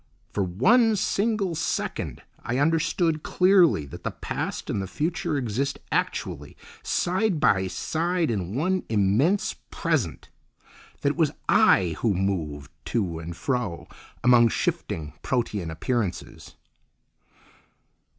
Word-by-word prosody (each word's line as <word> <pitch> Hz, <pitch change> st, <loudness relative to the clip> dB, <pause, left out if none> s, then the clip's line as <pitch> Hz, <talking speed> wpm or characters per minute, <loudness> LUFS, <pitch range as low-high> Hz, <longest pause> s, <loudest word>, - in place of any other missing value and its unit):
For 105 Hz, -, 0 dB
one 220 Hz, -, +4 dB
single 205 Hz, -2 st, 0 dB
second 165 Hz, -, -3 dB, 0.2 s
I 120 Hz, -, -1 dB
understood 165 Hz, +2 st, +1 dB
clearly 180 Hz, -, +4 dB
that 70 Hz, -, -10 dB
the -, -, -1 dB
past -, -, -4 dB
and 100 Hz, -, -1 dB
the 95 Hz, -, -4 dB
future 160 Hz, -, -2 dB
exist 130 Hz, +2 st, -1 dB
actually -, -, -2 dB, 0.2 s
side 185 Hz, 0 st, 0 dB
by 95 Hz, -10 st, +3 dB
side 165 Hz, -, -1 dB
in 95 Hz, -2 st, -3 dB
one 185 Hz, +6 st, +1 dB
immense 110 Hz, -, +2 dB, 0.2 s
Present; 125 Hz, -, -1 dB, 0.7 s
that -, -, +2 dB
it -, -, -3 dB
was -, -, +2 dB
I 85 Hz, -4 st, +4 dB
who 110 Hz, -5 st, +1 dB
moved 80 Hz, -7 st, -2 dB
to 90 Hz, -8 st, -1 dB
and 80 Hz, +1 st, -7 dB
fro 125 Hz, -10 st, -2 dB, 0.4 s
among 120 Hz, -1 st, +6 dB
shifting, 75 Hz, -7 st, -2 dB
protean 110 Hz, -9 st, -1 dB
appearances. 95 Hz, +4 st, -3 dB
125 Hz, 115 wpm, -25 LUFS, -, 0.7 s, among